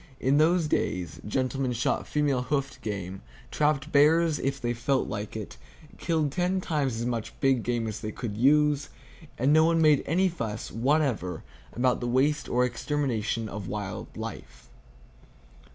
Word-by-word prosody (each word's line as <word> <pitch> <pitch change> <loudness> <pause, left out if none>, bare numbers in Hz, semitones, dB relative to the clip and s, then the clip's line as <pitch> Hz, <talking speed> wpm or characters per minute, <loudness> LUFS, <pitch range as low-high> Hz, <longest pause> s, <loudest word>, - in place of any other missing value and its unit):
In 135 +3 +3
those 165 +1 +3
days, 90 - -1
gentlemen 130 +2 -1
shot 120 - -1
female 145 -4 +1
hoofed 135 +1 -2
game, 95 -3 -5 0.3
trapped 150 -2 +1
bears 155 +2 +4
if 135 0 -2
they 120 -1 -1
felt 130 +3 0
like 105 0 -5
it, 105 - -7 0.4
killed 160 -4 0
ten 180 +4 0
times 140 -9 -1
as 120 - -2
much 120 -3 -4
big 135 -3 +3
game 120 0 -1
as 110 -1 -4
they 110 - -4
could 105 -1 -5
use, 145 +4 +3 0.5
and 135 +4 +3
no 155 0 +6
one 165 0 +3
made 155 -3 +5
any 185 +5 +3
fuss 115 - -4
whatever 125 - 0 0.3
about 125 +1 +1
the 120 - -3
waste 140 +5 +1
or 125 +1 +3
extermination 120 -3 -2
of 100 -2 -6
wild 100 -2 -5
life. - - -8
130 Hz, 155 wpm, -27 LUFS, 115-150 Hz, 0.5 s, no